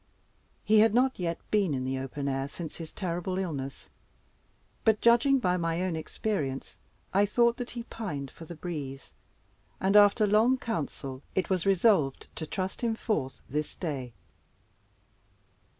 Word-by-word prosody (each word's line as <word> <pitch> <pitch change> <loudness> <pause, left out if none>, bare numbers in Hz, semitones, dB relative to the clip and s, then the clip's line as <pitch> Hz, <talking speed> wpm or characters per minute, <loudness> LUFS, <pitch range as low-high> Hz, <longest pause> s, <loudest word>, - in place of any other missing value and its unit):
He 215 0 +5
had 220 0 +5
not 260 -1 +3
yet 170 -2 -1
been 195 -8 +2
in 130 -1 -2
the 130 0 -1
open 135 +2 -4
air 135 0 -1
since 160 +2 -7
his 165 -2 -7
terrible 180 0 -3
illness, 140 -8 -4 0.9
but, 220 -2 +4
judging 235 +4 +5
by 180 -7 +1
my 165 0 -1
own 185 -3 -1
experience, 155 -4 -3 0.3
I 200 +2 +4
thought 235 +3 +3
that 245 -1 -4
he 235 - -3
pined 150 - -5
for 165 - -11
the 170 - -8
breeze, 145 -6 -6 0.7
and, 195 +2 +2
after 205 +1 +7
long 220 +5 +4
council, 140 - -4
it 190 0 0
was 185 0 +1
resolved 190 - +2
to 160 - -4
trust 190 +1 -3
him 230 -2 +1
forth 155 - -2
this 150 +2 -3
day. 135 -8 -4
180 Hz, 150 wpm, -29 LUFS, 145-215 Hz, 0.9 s, after